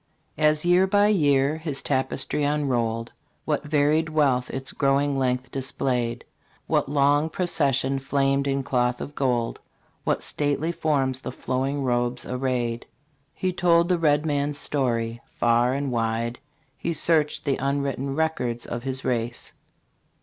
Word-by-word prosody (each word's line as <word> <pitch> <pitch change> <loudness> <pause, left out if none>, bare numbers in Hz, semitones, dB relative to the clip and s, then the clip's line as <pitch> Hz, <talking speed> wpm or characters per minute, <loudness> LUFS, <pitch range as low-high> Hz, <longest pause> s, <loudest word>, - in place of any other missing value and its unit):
As 155 +1 +3
year 180 +2 +4
by 205 +1 +4
year 145 -6 +3
his 155 -4 -2
tapestry 135 +2 -1
unrolled, 120 -6 0 0.3
What 150 -2 -1
varied 150 +2 +2
wealth 135 -5 +1
its 135 -1 -3
growing 140 0 +1
length 125 -1 -1
displayed! 125 -3 -1 0.4
What - - 0
long 145 +2 +3
processions 140 -6 +1
flamed 140 0 +1
in 135 0 0
cloth 125 -2 0
of 145 - -6
gold! 125 -5 -1 0.4
What - - 0
stately 145 +3 -1
forms 135 -6 0
the - - -6
flowing 135 +2 -2
robes 120 -1 -1
arrayed! 125 -2 -2 0.5
He 185 -1 -1
told 170 -1 +3
the 180 -2 +2
red 150 -1 +2
man's 145 -1 -1
story; 120 -6 0
far 120 +2 +2
and 140 -1 -2
wide 115 +1 -1 0.4
He 170 +3 -3
searched 155 -1 +2
the 140 -2 +1
unwritten 140 0 -2
records 125 -7 -1
of 120 - -5
his 130 +1 -3
race. 120 -1 -2
135 Hz, 135 wpm, -25 LUFS, 125-150 Hz, 0.5 s, year